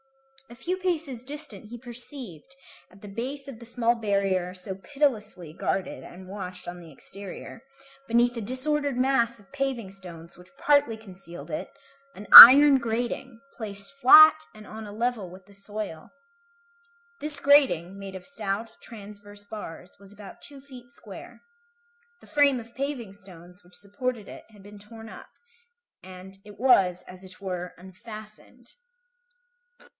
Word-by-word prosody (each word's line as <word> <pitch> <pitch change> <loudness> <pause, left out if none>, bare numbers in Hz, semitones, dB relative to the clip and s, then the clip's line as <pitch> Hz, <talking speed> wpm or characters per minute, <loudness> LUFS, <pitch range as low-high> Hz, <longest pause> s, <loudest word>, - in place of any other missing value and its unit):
A 235 - -13
few 360 +9 -4
paces 325 -10 -3
distant 280 -7 -7
he 240 - -9
perceived, 245 - -5 0.3
at 195 +2 -20
the 205 - -11
base 265 +7 -7
of 255 -5 -10
the 235 - -12
small 235 0 0
barrier 195 -5 -1
so 185 +1 -8
pitilessly 215 - -3
guarded 185 +2 -4
and 185 +1 -13
watched 185 -2 -9
on 175 0 -8
the 165 -2 -14
exterior, 195 - -10 0.5
beneath 240 +1 +1
a 230 - -5
disordered 275 +4 -1
mass 245 -3 0
of 200 +4 -23
paving 265 -7 -4
stones 170 -4 -13
which 180 +1 -18
partly 285 -6 +2
concealed 190 -5 -12
it, 310 - -5 0.5
an 205 - -11
iron 275 +2 +12
grating, 235 +1 -4 0.2
placed 200 +1 -5
flat 310 +4 +7
and 215 0 -13
on 220 0 -9
a - - -10
level 225 -3 -3
with 185 +1 -15
the 200 - -20
soil. 200 -4 -8 1.1
This 295 -1 +4
grating, 260 - +2
made 195 -1 -9
of 185 - -10
stout, 220 -4 -5
transverse 205 -2 -13
bars, 200 -4 -10
was 200 0 -15
about 205 -1 -13
two 280 -1 -10
feet 265 -2 -15
square. 285 - -13 0.8
The - - -19
frame 285 -3 +2
of 230 0 -14
paving 265 -7 -5
stones 180 -2 -16
which 180 0 -20
supported 210 +3 -5
it - - -12
had 205 -3 -19
been 205 +1 -14
torn 225 +2 -13
up, - - -13 0.7
and 185 +1 -13
it 205 -1 -15
was, 185 -8 +3
as 185 +1 -14
it 185 -1 -12
were, 180 -2 -6
unfastened. 215 +6 -12
215 Hz, 150 wpm, -25 LUFS, 190-255 Hz, 1.1 s, iron